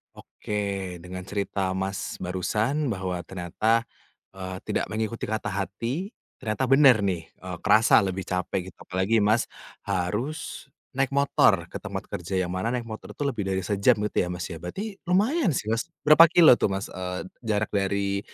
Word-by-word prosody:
Oke, 100 -4 -4
dengan 90 +1 -7
cerita 100 -1 -2
Mas 95 +1 -3
barusan 110 - -1
bahwa 90 -3 -3
ternyata, 110 +6 0 0.5
eee, 95 -1 -6
tidak - - 0
mengikuti 110 +2 -3
kata 110 0 -2
hati, 115 - -3 0.2
ternyata 120 +2 -2
benar 135 -3 +7
nih, 90 -5 -2
eee, 90 -1 -8
kerasa 110 0 +6
lebih 95 0 -3
capek 90 0 -2
gitu - - -45
apalagi 95 +4 +1
Mas 110 +3 +3 0.4
harus 105 - -3 0.2
naik 135 +1 0
motor 140 0 +3
ke - - -5
tempat - - -5
kerja 90 +3 -4
yang 90 -1 0
mana 95 +4 -2
naik 120 - -2
motor 110 -1 -9
itu - - -3
lebih 120 -8 -2
dari 95 -1 -1
sejam 100 +6 +3
gitu 105 - -3
ya 90 - +1
Mas 90 0 -4
ya, 80 - -6
berarti 195 - -6
lumayan 200 - +2
sih 110 +1 -2
Mas, 115 +8 -1 0.2
berapa 155 +3 +8
kilometer 165 -6 +7
tuh - - +3
Mas, 95 - -5
eee, 90 0 -4 0.2
jarak 105 -1 0
dari, 100 0 0
105 Hz, 165 wpm, -26 LUFS, 95-120 Hz, 0.5 s, berapa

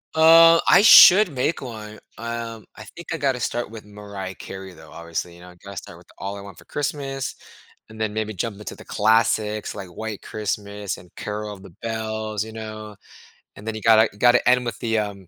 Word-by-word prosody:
Uh, 165 +1 +7
I 195 - +7
should 205 -3 +9
make 135 +5 -1
one. 110 -4 -9 0.2
Um, 115 -1 -6
I 105 - -11
think 170 - -11
I - - -2
gotta 135 -4 0
start 120 0 -3
with 110 -1 -11
Mariah 100 -2 -8
Carey, 95 -1 -9
though, - - -16
obviously, 85 +1 -6
you 85 - -16
know, 90 0 -13
gotta 100 -2 -10
start 85 - -9
with 85 0 -19
All 100 +1 -5
I - - -9
Want 100 -1 -12
for - - -16
Christmas, 140 -2 -4 0.5
and 110 0 -13
then 110 -1 -1
maybe 110 0 -3
jump 100 +2 -4
into 105 - -8
the - - -14
classics 110 -1 +1
like 95 -3 -8
White 110 +3 -7
Christmas 105 -2 -4
and 90 -1 -17
Carol 105 0 -5
of 95 - -13
the 95 - -12
Bells, 110 -1 -3
you 110 - -9
know. 110 -1 -8 0.6
And 105 - -13
then 110 - -3
you 110 - -6
gotta 110 -1 +5
you 100 - -20
gotta 120 +1 +4
end 125 0 +3
with 115 -2 -4
the, 115 -1 0
um, 100 -3 -5
110 Hz, 210 wpm, -22 LUFS, 100-115 Hz, 0.6 s, should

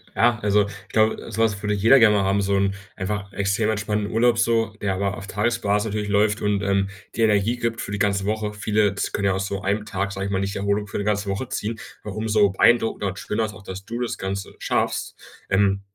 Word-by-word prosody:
ja 120 -1 +3
also, 105 0 +3
ich 100 0 -11
glaube, 110 +1 +1
so 110 +1 +1
was 105 -2 0
würde 105 0 0
jeder 115 +7 +6
gerne 110 -2 +6
mal 100 - +2
haben, 100 +1 +2
so 100 0 +1
'n 100 0 +1 0.2
einfach 100 +1 -4
extrem 100 +2 0
entspannenden 105 -1 -1
Urlaub 115 +1 +3
so, 115 -2 +1
der 100 -2 0
aber 100 0 -1
auf 100 - -8
Tagesbasis 105 0 0
natürlich 105 -1 -2
läuft 105 +1 +2
und, 105 -1 0
ähm, 100 0 +1 0.3
dir 115 - +3
Energie 105 +3 +2
gibt 115 -1 -2
für - - -5
die 105 - -3
ganze 100 -1 +1
Woche. 105 0 -1
Viele 105 -1 +1
z - - -2
jetzt - - -7
können 100 - -1
ja 95 - +3
aus 95 +1 -1
so 100 0 -3
einem 105 +2 -1
Tag, 100 -1 -2
sage 100 0 -4
ich 100 - -3
mal, 95 - +1
nicht 100 +1 -2
Erholung 100 +1 0
für - - -5
'ne 100 - -2
ganze 105 -1 0
Woche 100 +6 -3
ziehen, 110 +2 -3 0.2
ja, 105 - -6
umso 110 +1 -1
so - - +3
beeindruckender 110 +1 +3
und 95 +1 -4
schöner 110 +1 -1
ist 105 - -6
auch, 100 - -12
dass 95 +1 -8
du 120 +2 -5
das 120 - -2
Ganze 95 +1 -4
schaffst. - - -1 0.4
Ähm, 100 0 +3
105 Hz, 250 wpm, -23 LUFS, 100-110 Hz, 0.4 s, jeder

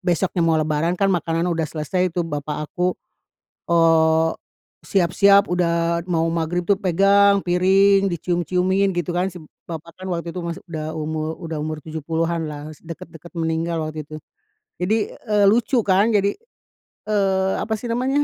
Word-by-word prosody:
besoknya 180 0 0
mau 165 -1 +3
lebaran 155 +2 0
kan 195 0 +2
makanan 165 -1 0
udah 165 -2 -1
selesai 165 +4 -1
tuh. 175 - +1
Bapak 150 -2 -4
aku, 180 +1 0 0.7
eee, 160 -1 +4 0.5
siap-siap 200 +2 +4
udah 170 -1 +1
mau 165 -2 +1
maghrib 170 +1 -1
tuh 195 +1 +2
pegang 200 +2 +4
piring 195 +2 +4
dicium-ciumin 180 +3 0
gitu 175 0 -1
kan 180 +2 0
si 180 - -11
b 160 - -10 0.2
bapak 165 0 -7
kan 185 - -6
waktu 170 -1 -3
itu 180 - -5
masih 170 +2 -6
udah 160 -2 -5
umur 155 0 -3
udah 165 -3 -5
umur 155 0 -5
tujuh 160 0 -6
puluhan 165 +1 -1
lah. 150 +1 -7
Es - - -17
dekat-dekat 165 0 -10
meninggal 165 +1 -1
waktu 155 -1 -6
itu. 155 - -7 0.6
Jadi, 195 +5 +1 0.2
eee, 210 -2 +1
lucu 235 +3 +2
kan 200 +3 +3
jadi, 200 -1 +2 0.8
eee, 190 -2 +2
apa 220 - -2
sih 235 +3 -6
namanya? 265 +5 +1
170 Hz, 160 wpm, -21 LUFS, 160-190 Hz, 0.8 s, eee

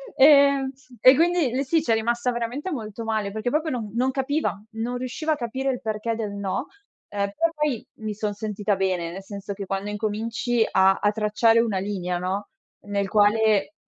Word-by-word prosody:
Ehm, 280 -1 +6 0.3
e 255 +1 +8
quindi 335 -5 +2
lei 265 +2 0
sì, 315 +3 +2
c'è 235 -7 +1
rimasta 235 +2 0
veramente 245 +9 -3
molto 225 -4 -5
male, 215 -3 -1
perché 220 +3 -2
proprio 310 +4 0
non 230 -7 -4
non 255 +2 +2
capiva, 270 -5 -1
non 230 +3 -3
riusciva 255 +6 -2
a - - -1
capire 260 +2 -3
il 250 - -5
perché 220 +1 -2
del 215 -3 -3
no. 200 +5 -3 0.4
Ehm, 200 -1 -2
però 330 0 +2
poi 300 -6 -1
mi 215 -1 -4
son 210 0 -3
sentita 205 0 -2
bene, 185 -3 -1
nel 190 +2 -8
senso 200 0 -6
che 200 0 -6
quando 195 +2 -3
incominci 220 +3 -1
a 190 0 +4
a 205 - +3
tracciare 220 +2 +3
una 215 -5 +1
linea, 185 -3 -2
no, 190 +3 -3 0.4
nel 200 -1 -1
quale 215 +2 +3
220 Hz, 185 wpm, -24 LUFS, 205-255 Hz, 0.4 s, e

